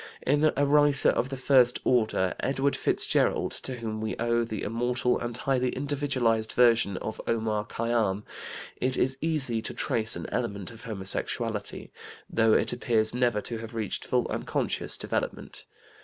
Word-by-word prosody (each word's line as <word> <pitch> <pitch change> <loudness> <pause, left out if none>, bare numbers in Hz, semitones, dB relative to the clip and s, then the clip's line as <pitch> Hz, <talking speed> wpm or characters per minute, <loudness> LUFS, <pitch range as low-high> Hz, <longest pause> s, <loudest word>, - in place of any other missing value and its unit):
In 150 +3 +3
a 145 - +3
writer 145 0 +4
of 130 - 0
the 135 - -5
first 125 -2 +4
order, 110 -6 +2
Edward 135 +1 0
Fitzgerald, - - +2
to 130 - -5
whom 110 -2 -5
we 110 - -2
owe 120 0 +1
the 110 -3 -5
immortal 120 +3 0
and 120 -1 -4
highly 130 -2 0
individualized 130 -6 0
version 115 -5 +4
of 110 - -5
Omar 110 -2 -1
Khayyam, 110 -4 0 0.5
it 130 +1 -1
is 130 +1 0
easy 140 -8 0
to - - -5
trace 110 -1 +2
an - - -6
element 100 -6 -3
of 115 +1 -12
homosexuality, 105 +1 -2 0.4
though 115 -1 +3
it - - +3
appears 115 -3 +2
never 120 -4 +1
to 115 +1 -3
have 115 +1 -8
reached 110 -4 -3
full - - 0
and - - -4
conscious - - -1
development. - - -3
120 Hz, 155 wpm, -27 LUFS, 110-130 Hz, 0.5 s, writer